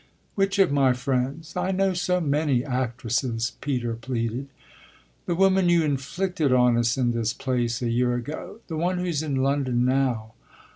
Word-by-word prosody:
"Which 195 Hz, 0 st, 0 dB
of 195 Hz, -6 st, +4 dB
my 135 Hz, -3 st, +4 dB
friends? 135 Hz, +5 st, -2 dB
I -, -, -1 dB
know 190 Hz, 0 st, +1 dB
so 180 Hz, 0 st, 0 dB
many 145 Hz, -4 st, +1 dB
actresses," 125 Hz, -2 st, -1 dB
Peter 125 Hz, -5 st, -1 dB
pleaded. 115 Hz, +2 st, -3 dB, 0.8 s
"The 175 Hz, -, 0 dB
woman 190 Hz, 0 st, +4 dB
you 170 Hz, -1 st, +4 dB
inflicted 155 Hz, +2 st, -1 dB
on 125 Hz, -1 st, +4 dB
us 120 Hz, +1 st, +1 dB
in 125 Hz, -2 st, +2 dB
this 115 Hz, -1 st, -1 dB
place 120 Hz, -2 st, -1 dB
a 120 Hz, -, 0 dB
year 125 Hz, +1 st, +1 dB
ago 150 Hz, -, -6 dB
the 160 Hz, -, -5 dB
one 180 Hz, +3 st, 0 dB
who's 175 Hz, -4 st, -1 dB
in 150 Hz, -3 st, -2 dB
London 130 Hz, -2 st, +1 dB
now." 125 Hz, -4 st, 0 dB
135 Hz, 160 wpm, -25 LUFS, 120-165 Hz, 0.8 s, of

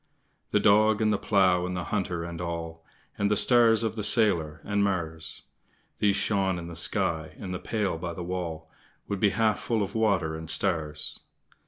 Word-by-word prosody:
The -, -, +2 dB
Dog, 110 Hz, +1 st, +4 dB
and 110 Hz, -1 st, +2 dB
the 100 Hz, -, -1 dB
Plough, 95 Hz, -4 st, +3 dB
and 90 Hz, 0 st, -4 dB
the 90 Hz, -, -3 dB
Hunter, 90 Hz, -2 st, -2 dB
and 85 Hz, 0 st, -6 dB
all, 85 Hz, -1 st, -5 dB, 0.4 s
And 100 Hz, 0 st, +2 dB
the 105 Hz, -, +2 dB
star 120 Hz, +1 st, +5 dB
of 115 Hz, -1 st, +1 dB
the 105 Hz, -, -4 dB
sailor, 85 Hz, -9 st, +2 dB
and 100 Hz, 0 st, 0 dB
Mars, 80 Hz, -5 st, -3 dB, 0.6 s
These 100 Hz, -2 st, +3 dB
shone 95 Hz, -3 st, +1 dB
in 85 Hz, -, -6 dB
the 85 Hz, 0 st, -8 dB
sky, 80 Hz, -1 st, 0 dB
and 95 Hz, -3 st, -6 dB
the 90 Hz, -, -4 dB
pail 100 Hz, -7 st, -2 dB
by 85 Hz, 0 st, -4 dB
the 90 Hz, -, -5 dB
wall 85 Hz, -3 st, -4 dB, 0.4 s
Would 100 Hz, -1 st, -3 dB
be 105 Hz, -, +4 dB
half 110 Hz, +1 st, +1 dB
full 115 Hz, -3 st, -1 dB
of 100 Hz, -, -5 dB
water 100 Hz, -8 st, +1 dB
and 80 Hz, 0 st, -8 dB
stars. 80 Hz, -6 st, -1 dB
95 Hz, 190 wpm, -27 LUFS, 85-105 Hz, 0.6 s, star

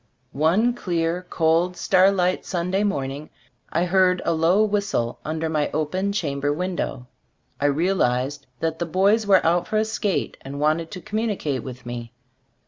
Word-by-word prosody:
One 180 Hz, -, +2 dB
clear, 175 Hz, -4 st, -2 dB
cold, 165 Hz, +2 st, +1 dB
starlight 185 Hz, -1 st, +3 dB
Sunday 180 Hz, +3 st, -1 dB
morning, 145 Hz, -6 st, -2 dB, 0.4 s
I 170 Hz, +2 st, +1 dB
heard 180 Hz, 0 st, +3 dB
a 170 Hz, -, +2 dB
low 165 Hz, +6 st, +3 dB
whistle 200 Hz, -, -1 dB
under 160 Hz, +1 st, -2 dB
my 155 Hz, -2 st, 0 dB
open 185 Hz, +6 st, -1 dB
chamber 145 Hz, -7 st, -1 dB
window. 175 Hz, -6 st, -3 dB, 0.5 s
I 145 Hz, -, 0 dB
real 170 Hz, +7 st, +1 dB
ized 130 Hz, +3 st, 0 dB
that 160 Hz, 0 st, -1 dB
the 170 Hz, -, -2 dB
boys 200 Hz, +5 st, +2 dB
were 195 Hz, -2 st, +5 dB
out 175 Hz, +1 st, +2 dB
for 215 Hz, -, 0 dB
a 215 Hz, -, +2 dB
skate 215 Hz, -3 st, -2 dB
and 140 Hz, +1 st, -7 dB
wanted 155 Hz, +2 st, +1 dB
to 185 Hz, -, -8 dB
communicate 205 Hz, -, -2 dB
with 130 Hz, -1 st, -9 dB
me. 120 Hz, -1 st, -6 dB
170 Hz, 155 wpm, -23 LUFS, 150-190 Hz, 0.5 s, were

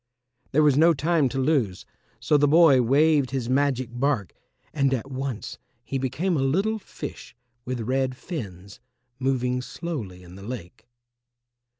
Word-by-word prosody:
There 155 Hz, +3 st, +4 dB
was 145 Hz, -3 st, +5 dB
no 165 Hz, +1 st, +6 dB
time 155 Hz, -1 st, +2 dB
to 135 Hz, -, -5 dB
lose, 130 Hz, -, 0 dB, 0.3 s
so 150 Hz, -, +1 dB
the 145 Hz, 0 st, +4 dB
boy 150 Hz, -4 st, +6 dB
waved 140 Hz, +2 st, +3 dB
his 125 Hz, -2 st, -3 dB
magic 130 Hz, -2 st, +1 dB
bark, 120 Hz, -, -1 dB, 0.4 s
and 140 Hz, -3 st, +2 dB
at 135 Hz, +3 st, -6 dB
once 130 Hz, -4 st, -5 dB, 0.2 s
he 135 Hz, -, -3 dB
became 150 Hz, +8 st, -1 dB
a 140 Hz, -, +1 dB
little 195 Hz, +11 st, +1 dB
fish 145 Hz, -, -9 dB, 0.3 s
with 125 Hz, -1 st, -3 dB
red 130 Hz, +2 st, -1 dB
fins, 100 Hz, -, -7 dB, 0.4 s
moving 125 Hz, -1 st, 0 dB
slowly 125 Hz, -, -6 dB
in 90 Hz, 0 st, -13 dB
the 95 Hz, -, -11 dB
lake. 110 Hz, -1 st, -8 dB
135 Hz, 150 wpm, -25 LUFS, 120-150 Hz, 0.4 s, no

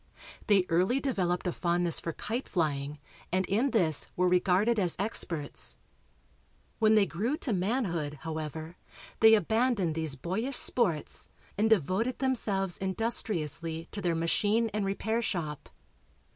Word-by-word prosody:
They 200 Hz, -4 st, +4 dB
early 185 Hz, +10 st, +2 dB
developed 185 Hz, -11 st, -1 dB
a 180 Hz, -, 0 dB
fondness 175 Hz, -1 st, 0 dB
for 165 Hz, -, -4 dB
kite 230 Hz, -, -4 dB
flying 150 Hz, -4 st, -1 dB, 0.3 s
and 185 Hz, +1 st, +1 dB
in 225 Hz, +9 st, +1 dB
this 170 Hz, -, +1 dB
were 180 Hz, 0 st, +2 dB
regarded 185 Hz, +5 st, +3 dB
as 180 Hz, -4 st, +2 dB
experts. 175 Hz, -7 st, -2 dB, 1.0 s
When 220 Hz, -1 st, +5 dB
they 210 Hz, -2 st, +5 dB
grew 210 Hz, -, -2 dB
to 265 Hz, -8 st, -2 dB
manhood, 180 Hz, -, -1 dB
however, 160 Hz, +1 st, -5 dB, 0.4 s
they 220 Hz, 0 st, +8 dB
abandoned 220 Hz, -3 st, +1 dB
these 160 Hz, -3 st, -1 dB
boyish 210 Hz, -, -1 dB
sports 175 Hz, -11 st, +1 dB, 0.3 s
and 215 Hz, +2 st, +2 dB
devoted 220 Hz, -, +1 dB
themselves 205 Hz, -8 st, 0 dB
industriously 170 Hz, -6 st, -1 dB
to 205 Hz, -, -5 dB
their 175 Hz, -2 st, 0 dB
machine 205 Hz, +7 st, +1 dB
and 210 Hz, -1 st, -1 dB
repair 220 Hz, +4 st, -1 dB
shop. 155 Hz, -9 st, -4 dB
185 Hz, 130 wpm, -29 LUFS, 165-220 Hz, 1.0 s, they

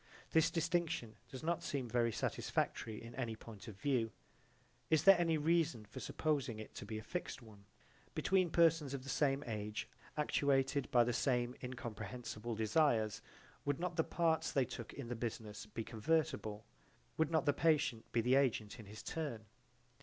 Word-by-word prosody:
This 160 Hz, 0 st, +5 dB
distinction 165 Hz, -9 st, 0 dB
does 130 Hz, +3 st, -8 dB
not 170 Hz, +1 st, 0 dB
seem 135 Hz, -4 st, -2 dB
very 120 Hz, 0 st, +2 dB
satisfactory 110 Hz, 0 st, -1 dB
in 115 Hz, +1 st, -10 dB
any 120 Hz, -4 st, -3 dB
point 110 Hz, -1 st, -11 dB
of 100 Hz, -3 st, -9 dB
view. 125 Hz, -4 st, +1 dB, 0.8 s
Is 160 Hz, -2 st, +4 dB
there 195 Hz, +2 st, +10 dB
any 165 Hz, -2 st, +3 dB
reason 155 Hz, -7 st, +2 dB
for 105 Hz, -, -9 dB
supposing 140 Hz, -7 st, -1 dB
it 110 Hz, -, -8 dB
to -, -, -7 dB
be 110 Hz, -, -4 dB
a 110 Hz, -, -6 dB
fixed 175 Hz, -3 st, -4 dB
one? 105 Hz, -3 st, -15 dB, 0.5 s
Between 185 Hz, -2 st, +3 dB
persons 165 Hz, -4 st, +4 dB
of 130 Hz, -, -6 dB
the 135 Hz, -, -8 dB
same 140 Hz, -1 st, +2 dB
age 105 Hz, -2 st, -3 dB, 0.3 s
actuated 140 Hz, -2 st, +2 dB
by 120 Hz, -1 st, +6 dB
the 120 Hz, +1 st, 0 dB
same 125 Hz, 0 st, +1 dB
incomprehensible 120 Hz, -2 st, -5 dB
desires 110 Hz, -1 st, +2 dB, 0.4 s
would 145 Hz, -1 st, 0 dB
not 175 Hz, 0 st, -2 dB
the 160 Hz, -, +3 dB
parts 165 Hz, -2 st, +1 dB
they 135 Hz, -2 st, +3 dB
took 120 Hz, -1 st, -7 dB
in 140 Hz, -4 st, -7 dB
the 120 Hz, -, -3 dB
business 110 Hz, -2 st, -5 dB
be 115 Hz, +2 st, -4 dB
convertible? 110 Hz, -3 st, 0 dB, 0.5 s
Would 160 Hz, -1 st, +3 dB
not 160 Hz, -2 st, +2 dB
the 145 Hz, -, +4 dB
patient 150 Hz, -7 st, +2 dB
be 115 Hz, -, +2 dB
the 125 Hz, +3 st, +2 dB
agent 125 Hz, -4 st, +2 dB
in 110 Hz, -, -10 dB
his 105 Hz, +2 st, -9 dB
turn? 140 Hz, -9 st, -4 dB
125 Hz, 170 wpm, -37 LUFS, 110-155 Hz, 0.8 s, there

